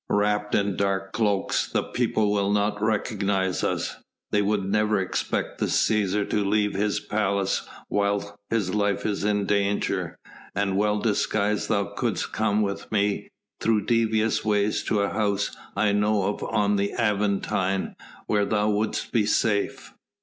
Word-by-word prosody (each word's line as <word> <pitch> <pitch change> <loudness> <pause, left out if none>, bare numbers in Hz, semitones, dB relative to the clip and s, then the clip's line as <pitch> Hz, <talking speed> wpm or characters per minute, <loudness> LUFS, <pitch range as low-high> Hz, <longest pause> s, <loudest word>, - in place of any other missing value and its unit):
Wrapped 105 0 +1
in 100 -2 +1
dark 95 -1 0
cloaks 105 -4 +1
the - - +1
people 110 -4 0
will 100 -1 +1
not 105 0 +1
recognise 100 -3 0
us. - - -1 0.3
They 105 - +3
would 100 -1 0
never 105 +1 +2
expect 95 - -2
the - - +1
Cæsar 105 -1 +1
to 105 - +2
leave 105 +1 +1
his 105 +1 0
palace 100 -2 -1 0.2
while 100 0 -1
his 105 -5 0
life 100 -1 0
is 100 -2 -1
in 105 -1 +1
danger, 100 -3 0 0.4
and 100 -1 0
well 105 +1 +2
disguised 105 -1 0
thou - - +2
couldst - - -2
come 110 0 +1
with 100 -1 -4
me 105 -1 0 0.3
through 110 -3 +1
devious 110 -1 +1
ways 105 -1 +1
to 105 - +1
a 100 - +1
house 100 -1 0 0.2
I 105 +1 +2
know 105 0 +2
of - - -8
on 105 -1 +1
the 100 0 -1
Aventine 100 -3 0 0.3
where 105 -1 +1
thou 105 0 +1
wouldst 105 +1 -1
be 110 -4 +2
safe." 105 -2 0
105 Hz, 150 wpm, -25 LUFS, 100-105 Hz, 0.4 s, They